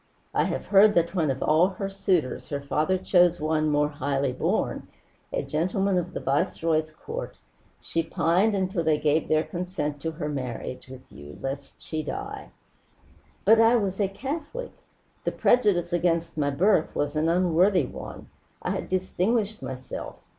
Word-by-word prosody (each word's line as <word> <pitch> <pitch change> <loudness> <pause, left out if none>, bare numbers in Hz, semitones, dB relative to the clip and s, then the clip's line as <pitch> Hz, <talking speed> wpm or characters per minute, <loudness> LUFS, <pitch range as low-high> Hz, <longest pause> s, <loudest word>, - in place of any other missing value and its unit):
"I - - +2
have - - -3
heard 205 +1 +6
that 170 0 +2
when 165 -6 +1
of 135 0 -1
all 155 +4 +4
her 195 +1 -4
suitors 190 -7 -1
her 145 - -2
father 150 +6 0
chose 180 -2 +3
one 155 0 +1
more 150 0 +2
highly 140 -2 -1
born, - - -1 0.4
a - - -1
gentleman 185 +4 0
of 175 +1 -5
the - - -1
Viceroy's 155 +3 0
court, 455 - -7 0.4
she 165 - -1
pined 180 +6 +2
until 190 -2 -1
they 155 -1 +3
gave 150 +1 +1
their 155 0 +3
consent 170 -6 -4
to 165 - -2
her 150 -1 -4
marriage 130 -3 -5
with 130 0 -11
you, 75 0 -11
lest 140 +1 -6
she 155 -1 -4
die." 405 - -6 1.0
"But 225 +1 +7
I 225 +2 +6
was 200 -3 0
a 200 - +3
Catholic! 290 - -5 0.5
The - - -1
prejudice 190 -8 +2
against 170 -1 +1
my 145 -2 +1
birth 165 +4 +2
was 145 +1 -1
an 155 +2 +2
unworthy 180 0 +3
one. - - -9 0.4
I - - -1
had - - -3
distinguished 200 +4 0
myself. 130 0 -6
170 Hz, 160 wpm, -26 LUFS, 150-195 Hz, 1.0 s, But